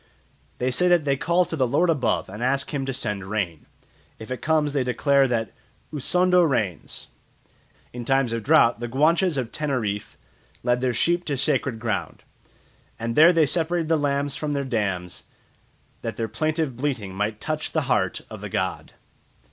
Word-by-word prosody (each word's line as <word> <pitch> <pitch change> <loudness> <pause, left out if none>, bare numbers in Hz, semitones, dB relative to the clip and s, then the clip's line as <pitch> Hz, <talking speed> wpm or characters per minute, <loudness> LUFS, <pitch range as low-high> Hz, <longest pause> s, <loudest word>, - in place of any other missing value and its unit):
They 125 +1 0
say 180 +9 +3
that 175 -4 +4
they 140 -1 +2
call 175 +6 +2
to 165 - -5
"the 130 -4 +1
lord 145 +8 +2
above" 145 -5 0
and 105 +4 -9
ask 135 +3 0
him 135 -2 -2
to - - 0
send 105 -6 -3
rain. 90 -8 -3 0.5
If 110 +3 -10
it 130 - -4
comes 155 -2 +1
they 140 -3 +1
declare 135 +2 +3
that 115 -4 -1 0.4
"Usondo 180 +5 +3
rains." 110 - -1 0.8
In 120 0 -5
times 135 -1 +1
of 115 - -2
drought 120 -3 +4
the 120 - -3
Guanches 155 +6 +2
of 125 -3 -2
Teneriffe 120 -9 -3 0.5
led 120 0 +1
their 130 -1 +1
sheep 175 +9 +1
to 140 -3 -1
sacred 130 -2 0
ground, 110 -2 -3 0.7
and 115 0 -3
there 160 +3 +8
they 165 -3 +4
separated 165 +2 0
the 165 - +4
lambs 140 -1 0
from 150 0 -3
their 140 -1 -1
dams, 100 -8 -3 0.8
that - - -5
their 115 - -1
plaintive 155 +4 -1
bleating 120 -7 -3
might 105 +2 -2
touch 155 +5 -3
the - - +1
heart - - 0
of - - -9
the - - -6
god. - - -3
135 Hz, 175 wpm, -24 LUFS, 115-155 Hz, 0.8 s, there